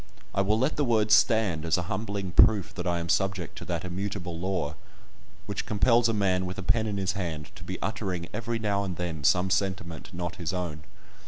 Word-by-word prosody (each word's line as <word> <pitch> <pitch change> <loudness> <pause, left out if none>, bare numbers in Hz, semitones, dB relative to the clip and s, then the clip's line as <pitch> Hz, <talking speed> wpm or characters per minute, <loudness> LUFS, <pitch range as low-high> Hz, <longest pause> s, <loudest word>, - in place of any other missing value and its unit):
I 100 - +2
will 105 +2 +2
let 130 +6 +1
the 145 - +2
words 110 -4 +3
stand, 105 -8 +4
as 85 +1 +2
a 90 - -1
humbling 100 0 -3
proof 105 0 +5
that 100 - -4
I 85 0 +1
am 85 0 -3
subject 95 0 0
to - - -8
that - - -3
immutable 90 -1 -4
law 90 -5 -1 0.7
which 100 -1 -4
compels 115 +2 +4
a - - +1
man 95 -2 +1
with 90 - -6
a 95 - -4
pen 110 +3 +2
in 105 -1 -2
his 95 -1 0
hand 85 -6 -4
to - - -11
be - - -5
uttering 90 -3 -3
every 115 +1 -2
now 100 -2 0
and 95 -3 -3
then 85 -4 -4
some 90 +6 +3
sentiment 90 -4 -1
not 85 +2 -4
his 85 0 -3
own. 85 -4 -3
95 Hz, 215 wpm, -28 LUFS, 90-105 Hz, 0.7 s, proof